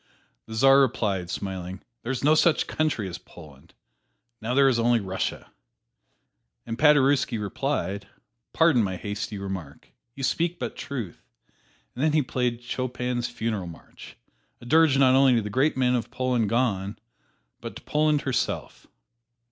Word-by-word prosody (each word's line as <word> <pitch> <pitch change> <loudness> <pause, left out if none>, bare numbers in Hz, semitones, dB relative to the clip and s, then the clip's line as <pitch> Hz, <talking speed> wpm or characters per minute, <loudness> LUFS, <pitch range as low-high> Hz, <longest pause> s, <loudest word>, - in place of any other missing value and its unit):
The 110 - -7
Czar 135 +4 +6
replied, 105 -9 0
smiling, 95 -1 -5 0.2
"There 120 - -4
is 130 - -3
no 150 +2 +5
such 155 +1 +3
country 155 -10 -1
as 90 -1 -7
Poland 75 -5 -16 0.7
now 115 +3 -2
there 140 0 +5
is 125 -3 +2
only 120 0 +3
Russia!" 95 -2 -4 1.1
And 115 - -4
Paderewski 145 -4 +4
replied, 105 -2 -3 0.4
"Pardon 160 -7 +4
my 95 -3 -1
hasty 105 +2 -5
remark 95 -7 -7 0.3
you 135 - -7
speak 170 +6 0
but - - -5
truth." 120 - -6 0.7
And 130 - -3
then 155 -1 +2
he 155 -2 +3
played 125 -2 -2
Chopin's 125 -1 -3
"Funeral 110 -5 -3
March," 85 - -13 0.4
a - - -14
dirge 155 +1 +4
not 130 -1 +5
only 135 -1 +5
to 115 - +2
the 105 - -5
great 135 +5 +1
men 125 -1 +2
of 120 -2 -1
Poland 125 -3 0
gone, 110 -4 0 0.6
but - - -8
to - - -11
Poland 150 -1 +1
herself. 130 -3 -3
120 Hz, 150 wpm, -25 LUFS, 100-135 Hz, 1.1 s, Czar